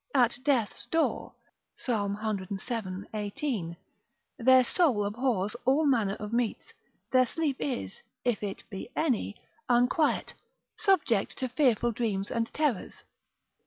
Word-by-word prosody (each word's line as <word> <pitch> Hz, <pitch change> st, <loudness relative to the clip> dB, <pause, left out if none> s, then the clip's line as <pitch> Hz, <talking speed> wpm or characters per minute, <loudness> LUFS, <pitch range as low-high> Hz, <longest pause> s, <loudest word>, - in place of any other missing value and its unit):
at 240 Hz, -1 st, +3 dB
death's 260 Hz, -7 st, +1 dB
door, 325 Hz, -1 st, 0 dB, 0.4 s
Psalm 205 Hz, -5 st, -1 dB
cvii. 200 Hz, -1 st, -3 dB
18. 205 Hz, -, -3 dB, 0.6 s
Their 260 Hz, +1 st, +6 dB
soul 250 Hz, -, +2 dB
abhors 215 Hz, -2 st, 0 dB
all 275 Hz, +5 st, +3 dB
manner 225 Hz, -8 st, +2 dB
of 210 Hz, +1 st, -7 dB
meats. 235 Hz, -2 st, -1 dB, 0.4 s
Their 255 Hz, -1 st, +5 dB
sleep 300 Hz, 0 st, -1 dB
is 100 Hz, -10 st, -3 dB, 0.2 s
(if 245 Hz, -3 st, +1 dB
it 200 Hz, -2 st, -4 dB
be 195 Hz, +3 st, -6 dB
any) 255 Hz, -8 st, 0 dB, 0.3 s
unquiet, 245 Hz, +5 st, +2 dB, 0.4 s
subject 295 Hz, -, +2 dB
to 260 Hz, -, -1 dB
fearful 240 Hz, -3 st, +2 dB
dreams 210 Hz, -4 st, -2 dB
and 230 Hz, -1 st, -1 dB
terrors. 290 Hz, -10 st, -1 dB
230 Hz, 120 wpm, -29 LUFS, 205-260 Hz, 0.6 s, Their